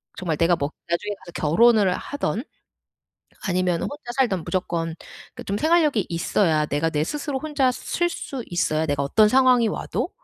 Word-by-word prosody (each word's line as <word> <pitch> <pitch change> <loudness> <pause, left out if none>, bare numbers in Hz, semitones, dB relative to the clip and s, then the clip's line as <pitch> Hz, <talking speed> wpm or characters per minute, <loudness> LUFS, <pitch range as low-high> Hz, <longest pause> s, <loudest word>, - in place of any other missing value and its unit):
정말 165 -4 -2
내가 170 +2 +3
뭐 145 -3 -2 0.2
나중에 205 +5 -1
가서 175 - -10 0.2
결혼을 215 +2 +5
하든 270 -5 -3 1.1
아니면 180 -2 +1
혼자 290 -4 -6
살든 200 -10 +1
무조건 165 -2 -2 0.4
그 - - -8
좀 200 - -2
생활력이 305 - +2
있어야 165 -2 +1
내가 150 +3 0
내 150 -1 0
스스로 290 - -3
혼자 285 -3 +1
설 345 +7 -1
수 275 -6 -6
있어야 160 -2 0
내가 145 -2 -1
어떤 210 +10 +4
상황이 255 -2 +4
와도 - - -3
195 Hz, 330 characters per minute, -23 LUFS, 165-255 Hz, 1.1 s, 결혼을